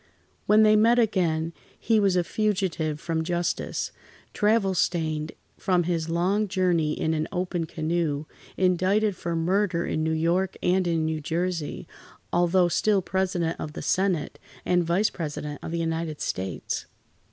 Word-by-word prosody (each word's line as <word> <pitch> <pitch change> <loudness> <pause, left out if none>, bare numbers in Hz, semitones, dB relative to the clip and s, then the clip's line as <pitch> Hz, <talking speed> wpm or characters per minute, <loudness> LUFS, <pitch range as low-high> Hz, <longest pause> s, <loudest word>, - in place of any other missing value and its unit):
When 215 +1 +6
they 215 0 +6
met 230 +3 +5
again, 170 -8 +1 0.3
he 225 -2 +2
was 195 -3 +3
a 180 - +3
fugitive 185 -7 -1
from 165 -1 -2
justice, 175 +1 -2 0.4
travel 210 -2 +2
stained 155 -3 -1 0.3
from 180 -2 +2
his 165 -1 -1
long 190 +6 +1
journey 175 -5 +1
in 160 - +1
an 155 0 -1
open 180 -3 -2
canoe, 155 -2 -1 0.3
indicted 190 +3 +2
for 170 -1 -3
murder 175 +1 +1
in 155 - -1
New 160 - 0
York, 170 +4 0
and 185 0 +2
in 165 -2 +1
New 160 0 -1
Jersey, 170 0 -2 0.5
although 175 +1 +3
still 195 +2 +2
President 180 -3 -1
of 150 - -5
the - - -6
Senate, 185 -5 0 0.3
and 180 -1 +3
Vice 175 +6 +1
President 150 -3 -5
of - - -6
the 170 - -2
United 165 -2 -2
States. 95 -1 -3
175 Hz, 150 wpm, -26 LUFS, 160-190 Hz, 0.5 s, When